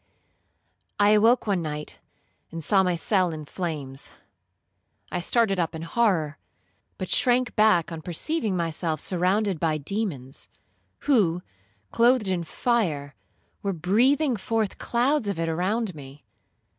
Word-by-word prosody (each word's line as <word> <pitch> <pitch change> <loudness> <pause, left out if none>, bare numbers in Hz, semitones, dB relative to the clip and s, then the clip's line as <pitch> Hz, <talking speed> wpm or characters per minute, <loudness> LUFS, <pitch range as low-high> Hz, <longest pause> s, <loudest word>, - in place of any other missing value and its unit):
'I 205 0 +5
awoke 225 +4 +4
one 195 -4 0
night, 150 -1 -5 0.5
and 165 -1 -6
saw 195 +5 +4
my 180 -2 +1
cell 185 +1 +1
in 155 -1 -7
flames; 145 -6 -5 1.0
I 175 - -2
started 205 -1 +2
up 165 -1 -1
in 160 - -6
horror, 165 -7 0 0.6
but 185 - -4
shrunk 250 -1 +2
back 210 -7 +3
on 165 -1 -6
perceiving 200 - -2
myself 165 -1 -2
surrounded 185 +1 0
by 155 -1 +1
demons, 150 - -4 0.5
who, 185 - +2 0.5
clothed 235 -3 +3
in 180 -2 0
fire, 160 - -1 0.5
were 200 -1 -1
breathing 245 - +2
forth 220 0 -2
clouds 245 +1 +1
of 200 -3 -2
it 165 0 -1
around 185 +6 -1
me. 140 -1 -12
185 Hz, 130 wpm, -25 LUFS, 160-220 Hz, 1.0 s, I